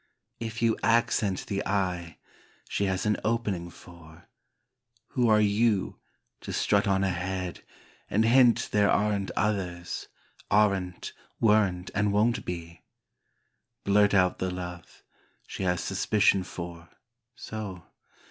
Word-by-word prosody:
If 115 0 -4
you 115 -1 +2
accent 110 -4 +1
the 100 -1 -2
I, 90 -4 -2 0.5
she 100 - -1
has 95 0 -1
an 105 0 +2
opening 105 -6 -1
for, 85 -1 -15 0.8
who 125 -3 +1
are 110 -1 +5
you 105 -1 +1 0.4
to - - -7
strut 100 0 +1
on 95 0 +2
ahead 90 -1 -3 0.5
and 110 +2 +2
hint 120 0 +4
there 100 -1 +3
aren't 100 -2 +1
others, 90 -5 -2 0.4
aren*t, 100 -4 +1 0.3
weren't 100 -5 +2
and 105 0 +1
won't 110 +4 +2
be? 85 -1 -6 1.0
Blurt 100 0 +4
out 90 -2 +3
the 95 - -1
love, 90 -1 -8 0.4
she - - -7
has 90 -2 0
suspicion 100 +1 +2
for, 85 -1 -8 0.5
so? 105 -7 -7
100 Hz, 120 wpm, -27 LUFS, 90-105 Hz, 1.0 s, are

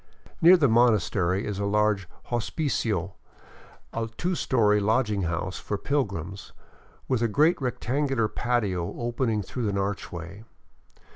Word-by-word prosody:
Near 180 +3 +8
the 150 -5 +4
monastery 105 -5 +2
is 100 -2 -4
a 100 - -1
large 105 -3 +1 0.2
hospicio, 115 - -1 0.8
a 115 -1 -2
two 180 +1 -1
story 110 -10 +2
lodging 105 0 +1
house 85 +2 -2
for 105 - -3
pilgrims, 100 - -3 0.5
with 130 -3 0
a 115 - +3
great 150 - +3
rectangular 125 -1 0
patio 105 -8 -1
opening 120 -3 -1
through 120 -1 -3
an 100 - -1
archway. 95 -1 -4
110 Hz, 125 wpm, -26 LUFS, 100-125 Hz, 0.8 s, Near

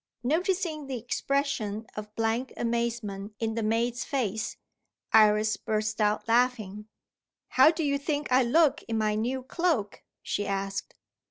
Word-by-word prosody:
Noticing 325 +1 0
the 265 -2 -3
expression 240 -3 -1
of 210 0 -7
blank 225 +3 -1
amazement 230 -4 -2
in 225 -1 -1
the 230 - -2
maid's 235 +3 0
face, 220 -6 -2 0.6
Iris 215 0 +5
burst 215 0 -2
out 210 +1 +1
laughing. 225 -4 +1 0.6
"How 260 +4 +6
do 325 0 -1
you 280 -1 +1
think 290 -1 -2
I 255 +1 +6
look 295 +5 +3
in 225 - -1
my 215 -1 +1
new 245 +5 -1
cloak?" 280 - -1 0.2
she 205 - -2
asked. 195 0 -3
230 Hz, 140 wpm, -28 LUFS, 215-265 Hz, 0.6 s, How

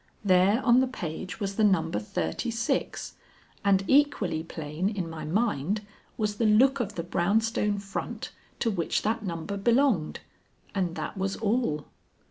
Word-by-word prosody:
There 190 +5 +4
on 240 0 +6
the 260 - +3
page 185 -6 -5
was 195 -2 -3
the 220 - +3
number 165 - +2
thirty 95 - -3
six, 230 0 -2 0.5
and 195 -1 +3
equally 265 - +3
plain 160 +2 -3
in 195 -5 -3
my 160 -2 -6
mind 205 - 0 0.3
was 210 -2 -1
the 230 - +1
look 260 +6 +5
of 215 -3 -3
the 170 - -3
brown 175 +5 +2
stone 210 -2 0
front 200 -1 -5 0.3
to 230 - +2
which 175 -5 -1
that 225 +2 0
number 180 +2 -4
belonged 230 - +2 0.5
and 180 -4 -1
that 190 - -5
was 195 0 -1
all. 210 - 0
200 Hz, 155 wpm, -28 LUFS, 170-225 Hz, 0.5 s, on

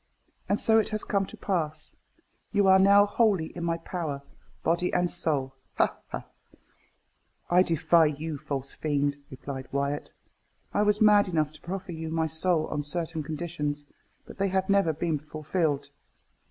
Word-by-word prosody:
And 200 - +2
so 225 0 +4
it 215 - 0
has 215 -1 -2
come 195 -1 0
to - - -11
pass. 155 -5 -2 0.6
You 205 -2 +3
are 190 0 +7
now 200 +1 +7
wholly 205 -6 +1
in 170 - -5
my 165 0 0
power, 160 -5 -4 0.4
body 170 +2 +1
and 180 0 +2
soul 145 -6 -1 0.2
ha! - - +2
ha!" - - -6 1.3
"I 180 +1 +6
defy 165 -1 +4
you, 150 0 -4
false 135 -1 -3
fiend," 145 -2 0
replied 130 0 -7
Wyat. 140 +1 -2 0.6
"I 205 - +2
was 210 0 +2
mad 210 -1 +6
enough 155 -4 0
to 155 - -16
proffer 190 +1 -5
you 160 -1 -5
my 160 0 0
soul 160 +1 +2
on 150 - -2
certain 160 +2 -3
conditions; 150 -1 -3 0.4
but - - -13
they 195 - +2
have 190 +1 0
never 195 -4 +4
been 155 0 -1
fulfilled." 150 -1 -2
165 Hz, 160 wpm, -27 LUFS, 150-190 Hz, 1.3 s, are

